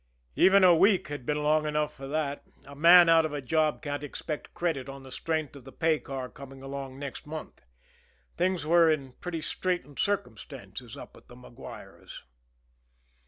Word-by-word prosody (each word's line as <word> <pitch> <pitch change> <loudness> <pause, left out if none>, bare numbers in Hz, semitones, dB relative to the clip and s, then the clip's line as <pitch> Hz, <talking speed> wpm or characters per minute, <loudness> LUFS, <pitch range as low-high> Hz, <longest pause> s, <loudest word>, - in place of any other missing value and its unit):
Even 195 0 +6
a 180 -1 +8
week 190 +2 +3
had 145 -4 -7
been 150 0 0
long 155 +1 +2
enough 150 0 -1
for 135 0 -8
that 145 -1 -2 0.2
a 140 +1 -12
man 170 +3 +8
out 165 0 +6
of 155 -2 -3
a 145 - -2
job 155 +3 0
can't 145 -1 -4
expect 150 +1 -6
credit 155 -7 -2
on 135 0 -9
the 130 - -12
strength 155 0 -3
of 140 - -12
the 135 - -12
pay 160 0 +1
car 135 -2 -6
coming 135 +1 -12
along 135 -1 -6
next 140 +1 -7
month. 155 +1 -8 0.7
Things 180 -3 0
were 165 +1 +5
in 140 -4 -1
pretty 165 +3 -5
straitened 175 -5 -3
circumstances 200 0 -4
up - - -11
at - - -20
the 125 - -14
Maguires. 125 -1 -12
150 Hz, 175 wpm, -28 LUFS, 140-165 Hz, 0.7 s, a